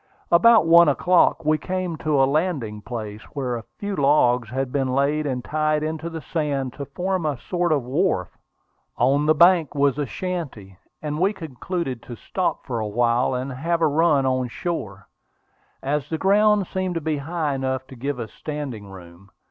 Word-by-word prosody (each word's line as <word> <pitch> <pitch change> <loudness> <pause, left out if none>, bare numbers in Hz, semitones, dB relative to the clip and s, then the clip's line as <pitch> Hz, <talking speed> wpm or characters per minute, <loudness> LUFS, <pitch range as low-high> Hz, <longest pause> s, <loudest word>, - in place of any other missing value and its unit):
About 220 +3 +6
one 170 -1 +7
o'clock 175 +2 +3
we 155 0 +2
came 185 0 -3
to 150 -4 +2
a - - +6
landing 135 - -1
place, 110 -2 -6
where 130 -4 -2
a 115 - -7
few 205 -1 -3
logs 125 - +3
had 130 +1 -2
been 135 -1 0
laid 145 +2 +1
and 125 -2 -3
tied 155 0 0
into 160 +1 -3
the 165 -1 -6
sand 140 -5 -2
to 140 - -6
form 180 +6 -2
a 150 -3 -1
sort 175 +7 -1
of 145 -4 +2
wharf. 135 - -1 0.6
On 140 +4 +2
the 155 - +5
bank 170 -1 +4
was 140 0 +2
a 145 - -1
shanty, 125 - -5 0.2
and 150 0 -3
we 195 +4 +2
concluded 160 - -4
to 120 - -9
stop 185 +9 -3
for 120 -3 -3
a 110 - -2
while 120 +3 +1
and 130 +2 -3
have 165 +6 -1
a 165 - +3
run 150 -2 +3
on 130 -1 +1
shore, 105 - -5 0.8
as 140 0 -1
the 160 - -1
ground 205 +2 +3
seemed 185 0 -3
to - - 0
be 155 -1 -1
high 155 0 -2
enough 130 -1 -2
to 130 - -12
give 135 +2 -3
us 115 -2 -6
standing 140 -9 -6
room. 90 0 -13
145 Hz, 185 wpm, -23 LUFS, 125-170 Hz, 0.8 s, one